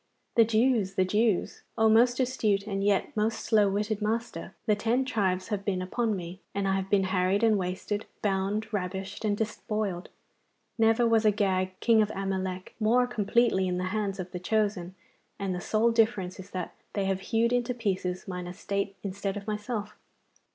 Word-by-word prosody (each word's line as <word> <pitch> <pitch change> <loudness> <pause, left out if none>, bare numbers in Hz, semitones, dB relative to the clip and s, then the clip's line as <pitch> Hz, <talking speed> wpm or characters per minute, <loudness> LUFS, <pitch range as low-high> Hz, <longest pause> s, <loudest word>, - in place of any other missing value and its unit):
'The 230 - +6
Jews, 220 -3 +2
the 185 - +3
Jews, 210 +1 +1 0.2
oh 225 - +4
most 240 +3 +4
astute 220 -6 +1
and 195 -2 -2
yet 200 -1 +1
most 220 +1 0
slow 210 -2 +4
witted 210 +2 -1
master! 225 +3 -3
The 210 - +3
ten 235 +5 +1
tribes 195 -7 0
have 205 -2 -2
been 195 -2 -1
upon 215 +4 -1
me, 180 0 -7 0.2
and 200 -1 0
I 190 - +2
have 195 0 -2
been 200 -1 +3
harried 185 +2 +1
and 225 -2 +5
wasted, 190 +2 -3 0.2
bound, 205 +2 -1
ravished, 190 +1 -4
and 205 -1 +1
despoiled. 210 -4 -3 0.7
Never 225 +1 +3
was 225 -1 +3
Agag, 190 -3 +1
king 230 -2 +5
of 210 - +1
Amalek, 190 -1 -3
more 235 +3 +4
completely 230 -4 +2
in 180 0 -1
the 185 +1 -2
hands 200 -2 -1
of 180 -1 -5
the 180 - -5
chosen, 200 -2 -1 0.4
and 195 -2 -2
the 180 - -4
sole 225 +5 +2
difference 220 -6 +1
is 190 - -9
that 180 -2 -5 0.2
they 200 -2 0
have 190 -1 0
hewed 230 +4 +1
into 245 0 0
pieces 185 -5 -2
mine 180 -1 -5
estate 200 +2 -3
instead 200 0 -3
of 200 - -7
myself. 210 0 -4
205 Hz, 180 wpm, -28 LUFS, 190-220 Hz, 0.7 s, The